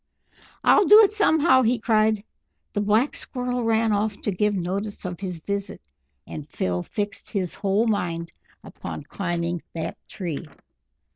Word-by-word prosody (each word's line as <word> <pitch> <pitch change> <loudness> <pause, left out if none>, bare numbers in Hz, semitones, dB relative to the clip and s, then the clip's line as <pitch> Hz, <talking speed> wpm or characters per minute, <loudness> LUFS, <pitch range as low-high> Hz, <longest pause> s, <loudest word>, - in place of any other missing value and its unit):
"I'll 410 - +5
do 425 +2 +10
it 410 0 +3
somehow!" 320 -10 +4
he 245 0 +2
cried. 215 -2 +2 0.5
The 205 - 0
Black 215 +7 +2
Squirrel 250 -1 -3
ran 225 0 +2
off 205 0 0
to 205 - -1
give 205 +2 +1
notice 195 +3 -3
of 180 -2 -4
his 185 -3 -4
visit, 200 +4 -4 0.5
and 150 -1 -8
Phil 90 -1 -1
fixed, 205 - -4
his 185 -4 -2
whole 200 +3 +1
mind 170 -6 -1 0.3
upon - - -7
climbing 175 -2 -2
that 165 - -4
tree. 170 -4 -5
205 Hz, 145 wpm, -24 LUFS, 180-225 Hz, 0.5 s, do